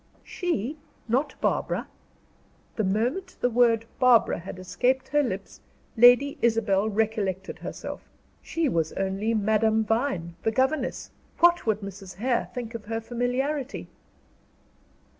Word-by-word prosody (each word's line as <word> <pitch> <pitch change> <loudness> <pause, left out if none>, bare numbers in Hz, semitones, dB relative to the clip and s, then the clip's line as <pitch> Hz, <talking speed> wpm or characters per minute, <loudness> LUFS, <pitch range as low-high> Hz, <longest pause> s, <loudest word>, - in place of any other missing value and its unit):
"She? 310 - -2 0.3
Not 265 +6 0
Barbara?" - - 0 0.9
The 220 - 0
moment 240 - -1
the 245 - +1
word 230 -1 +3
"Barbara" 250 -7 +4
had 185 +2 -8
escaped 250 +8 0
her 295 +2 +3
lips, 195 -7 -5 0.3
Lady 245 +4 +6
Isabel, 220 -3 +2
recollected 205 -3 -1
herself. - - -7 0.3
She 330 -2 -1
was 165 - 0
only 195 +4 -1
Madame 220 +1 +2
Vine, 225 -7 -1
the 225 - +1
governess; 260 +4 -1 0.3
what 345 -5 +4
would 215 -1 +1
Mrs. 195 -1 -8
Hare 240 +5 0
think 240 -2 -6
of 225 -2 -7
her 225 +1 -2
familiarity? 250 +4 -2
230 Hz, 120 wpm, -26 LUFS, 205-260 Hz, 0.9 s, Lady